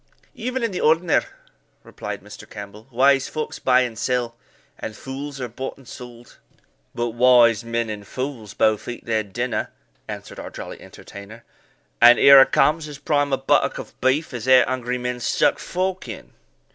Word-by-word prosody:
"Even 255 0 -4
in 230 - 0
the 180 - -4
ordinar," 160 +2 +3 0.6
replied - - -7
Mr. - - -12
Campbell; 105 +2 -10
"wise 135 +2 +3
folks 155 -1 -5
buy 130 -1 +3
and 120 -4 -3
sell, 125 -2 -1 0.4
and 110 - -6
fools 135 +3 -7
are 125 - -3
bought 130 +3 -7
and 135 -3 -18
sold." 120 0 -12 0.6
"But 120 0 -1
wise 120 -2 +4
men 115 0 -2
and 105 -2 -7
fools 125 -6 -6
both 110 -1 +1
eat 120 - -7
their 110 -2 0
dinner," 120 +4 -3 0.4
answered - - -8
our - - -7
jolly - - -9
entertainer; 105 +3 -12 0.6
"and 120 +1 +8
here 140 -1 +9
a - - +6
comes 155 +1 +2
as 145 -2 -9
prime 145 -1 0
a 135 - +2
buttock 135 - +1
of - - -9
beef 135 +4 +1
as 120 0 -6
e'er 130 -1 +6
hungry 125 -1 -2
men 125 0 -4
stuck - - +1
fork 185 -3 -3
in." 115 - -9
125 Hz, 170 wpm, -22 LUFS, 115-140 Hz, 0.6 s, here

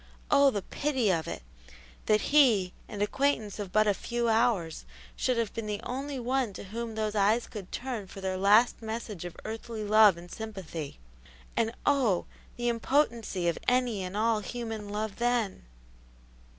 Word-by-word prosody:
Oh, 280 0 +7
the 205 -7 -2
pity 265 -6 0
of 165 -3 -1
it! 85 -7 -5 0.6
that 215 0 +4
he, 225 -11 +5 0.2
an 205 -1 -2
acquaintance 220 -3 0
of 200 -3 -5
but 215 +2 +4
a 205 - +3
few 235 +3 -1
hours, 220 -8 +1 0.3
should 255 -2 0
have 230 -3 -1
been 225 -2 -4
the 205 -1 -2
only 275 +2 -4
one 250 -2 0
to - - -8
whom 225 +3 -5
those 215 -1 -1
eyes 215 +3 +3
could 200 -5 -9
turn 240 -6 -4
for 195 - -10
their 190 -1 -2
last 205 +7 +4
message 220 -5 -5
of 175 - -7
earthly 225 0 -5
love 210 -3 +6
and 175 +1 -11
sympathy; 190 -9 -6 0.6
and 225 -1 +1
oh, 250 -11 +3 0.3
the 240 0 -1
impotency 230 -6 +1
of 170 - 0
any 245 -5 +2
and 185 +2 -4
all 225 0 +2
human 225 -1 -5
love 210 0 -3
then! 240 - 0
220 Hz, 165 wpm, -29 LUFS, 200-240 Hz, 0.6 s, Oh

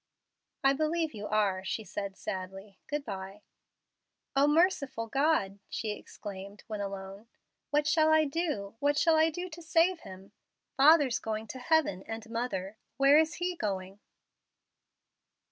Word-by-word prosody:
"I 270 0 +5
believe 315 +1 0
you 210 -1 -6
are," 200 -3 +1
she 220 +3 -3
said, 200 0 -5
sadly. 195 +1 -6
"Good 295 -1 -3
by." 195 0 -7 0.9
"O 275 +1 +5
merciful 295 -7 +2
God!" 230 -6 +1
she 215 -1 -3
exclaimed 200 -1 -9
when 215 -2 -5
alone. 195 +2 -6 0.4
"What 295 0 +2
shall 315 0 +4
I 315 0 +5
do 280 - -2
what 290 0 +2
shall 330 +1 +4
I 315 +1 +4
do 355 +3 -5
to 335 +2 -9
save 335 +2 +2
him? 190 -4 -12 0.4
Father's 285 -2 +5
going 220 0 -3
to 260 - -6
heaven 260 - +2
and 225 0 -6
mother. 220 -4 -3 0.2
Where 275 +2 +6
is 320 +1 +1
he 355 +1 -2
going?" 195 - -4
230 Hz, 145 wpm, -30 LUFS, 200-310 Hz, 0.9 s, Where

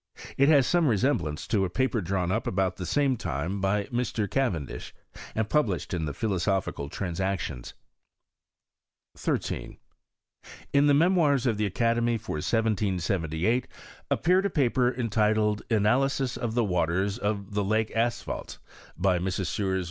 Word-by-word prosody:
It 140 +2 +4
has 140 -4 +6
some 175 +1 +2
resemblance 115 - 0
to 105 -4 +1
a 95 - 0
paper 130 +3 0
drawn 90 0 -1
up 110 +3 -1
about 95 -1 0
the 90 - -5
same 140 -3 +2
time 90 +5 -3
by 100 +2 +1
Mr. 120 -3 -1
Ca 135 +5 +1
irendish, 70 -9 -6 0.4
and 110 -1 0
published 110 - 0
in 85 -3 -1
the 75 - -3
Philosophical 95 -7 -1
Trans 90 +1 -4
ictions. 95 -10 -3 1.4
13. - - -3 1.0
In 140 +1 +5
the 145 - +5
Memoirs 155 -5 +3
of 115 -4 +1
the 105 -1 +1
Academy, 115 +3 +1
for 110 -7 -5
1778, 95 0 0 0.4
BLppeared 185 +3 +2
a - - +2
paper 125 -6 +2
entitled 110 -3 +1
" - - -44
Analysis 125 +4 +2
of 115 -1 -3
the 120 - +3
Water* 90 -1 +1
[>f 105 +1 -1
the 105 0 0
Lake 110 +3 0
Asphaltes, 115 +1 -2 0.4
by 90 0 +2
Messrs. 95 +1 -2
105 Hz, 145 wpm, -27 LUFS, 95-125 Hz, 1.4 s, has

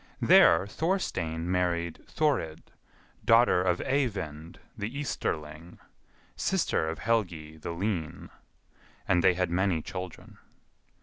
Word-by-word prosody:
There 80 +3 +6
Thorstein 100 - -2
married 85 -2 -1
Thorid, 135 - -1 0.5
daughter 115 -5 +5
of 90 -1 +1
Eyvind 95 - -2 0.2
the 105 - -4
Easterling, 80 - -4 0.6
sister 80 - 0
of 80 - -4
Helgi 85 -9 -1
the 80 - -7
Lean; 85 -2 -3 0.8
and 90 -2 +3
they 90 0 +5
had 90 -1 -1
many 90 -1 +1
children. 90 0 -8
90 Hz, 105 wpm, -28 LUFS, 80-105 Hz, 0.8 s, There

